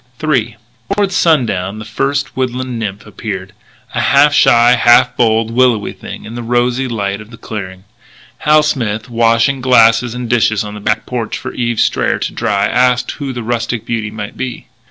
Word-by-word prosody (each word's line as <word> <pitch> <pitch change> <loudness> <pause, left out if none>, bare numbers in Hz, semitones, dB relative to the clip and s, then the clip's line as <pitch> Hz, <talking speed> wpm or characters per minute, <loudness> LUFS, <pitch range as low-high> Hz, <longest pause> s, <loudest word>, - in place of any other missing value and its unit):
III 125 -8 0 0.4
Toward 200 -2 +1
sundown 115 - +1
the 110 - -8
first 135 +5 -2
woodland 130 -1 -3
nymph 105 -2 -5
appeared 100 -2 -6 0.4
a - - 0
half 145 +1 +4
shy, 120 -3 +5
half 120 +1 +4
bold, 115 -1 +1
willowy 120 -3 +2
thing - - -9
in 110 - -8
the 120 - -5
rosy 120 +2 0
light 100 -4 -3
of 105 - -13
the 115 - -12
clearing. 95 -4 -7 0.6
Hal 150 0 +4
Smith, 120 -7 -2
washing 115 +3 +2
glasses 120 -1 +4
and 125 -1 -4
dishes 110 -2 +2
on 105 0 -7
the 105 - -8
back 105 +1 -1
porch 120 -3 -3
for - - -7
Eve 120 -2 -2
Strayer - - +1
to - - -4
dry, 100 0 0
asked 125 +2 +1
who 140 -3 -5
the 120 -2 -5
rustic 115 -1 -2
beauty 115 -3 -2
might 110 0 -7
be. 130 -1 -5
120 Hz, 175 wpm, -15 LUFS, 110-125 Hz, 0.6 s, shy